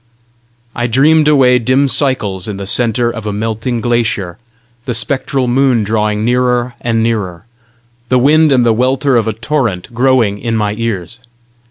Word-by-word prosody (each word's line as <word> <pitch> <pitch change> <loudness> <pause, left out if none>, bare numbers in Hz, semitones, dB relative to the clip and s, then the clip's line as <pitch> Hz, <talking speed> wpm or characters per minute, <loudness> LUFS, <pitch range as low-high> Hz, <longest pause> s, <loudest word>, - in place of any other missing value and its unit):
I 120 0 -1
dreamed 150 +6 +3
away 130 -4 +4
dim 130 +4 +1
cycles 120 -8 -1
in 105 -2 -5
the 100 - -6
centre 120 +3 0
of 115 -3 -7
a - - -1
melting 110 +3 -3
glacier, 110 -7 -1 0.5
the 125 - -3
spectral 135 +1 -1
moon 125 -2 +2
drawing 105 0 -1
nearer 125 0 0
and 115 -2 0
nearer, 105 -5 -3 0.6
the 130 - +3
wind 150 +4 +4
and 125 -3 +3
the 115 - +3
welter 130 +3 +1
of 115 -2 +1
a 110 - -1
torrent 115 -4 -3
growing 120 -4 +1
in 115 +1 -2
my 105 -2 -1
ears. 115 -1 -4
120 Hz, 160 wpm, -14 LUFS, 110-130 Hz, 0.6 s, away